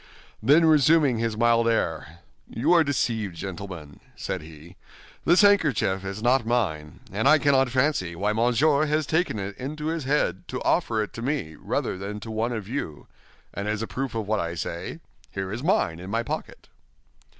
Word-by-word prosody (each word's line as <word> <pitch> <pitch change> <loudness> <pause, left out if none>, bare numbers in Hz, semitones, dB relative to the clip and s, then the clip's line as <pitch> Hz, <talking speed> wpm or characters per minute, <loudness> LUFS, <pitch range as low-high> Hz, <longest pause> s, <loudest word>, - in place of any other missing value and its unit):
Then, 145 +8 +5
resuming 150 -4 +4
his 115 -2 -1
mild 115 0 +3
air, 80 -6 -2 0.3
"You 145 +9 +1
are 170 -2 +6
deceived, 115 - -1
gentlemen," 90 -5 -7 0.2
said - - -4
he, 80 +3 -13 0.5
"this 175 +5 +5
handkerchief 145 - +3
is 100 +3 -6
not 125 +1 +3
mine, 95 -11 -2
and 105 +7 0
I 155 - +7
cannot 135 -3 +3
fancy 125 - 0
why 100 +4 0
Monsieur 135 +7 +2
has 150 +1 +1
taken 160 -5 0
it 100 0 -5
into 150 +4 -5
his 165 -4 -3
head 130 - 0
to - - -5
offer 110 -2 +1
it 105 - -8
to 115 - -7
me 125 - -2
rather 95 - -3
than 100 +2 -5
to 110 - -7
one 110 +2 -1
of 110 -5 -4
you; 110 - -5 0.5
and 100 +2 -4
as 105 +1 -1
a - - -4
proof 135 -3 -4
of 110 -3 -3
what 110 0 +1
I 85 -1 -3
say, 80 - -5 0.3
here 95 -1 -5
is 110 +4 -4
mine 85 - +1
in 90 +2 -8
my 115 +3 0
pocket." - - -6
115 Hz, 185 wpm, -25 LUFS, 95-140 Hz, 0.5 s, I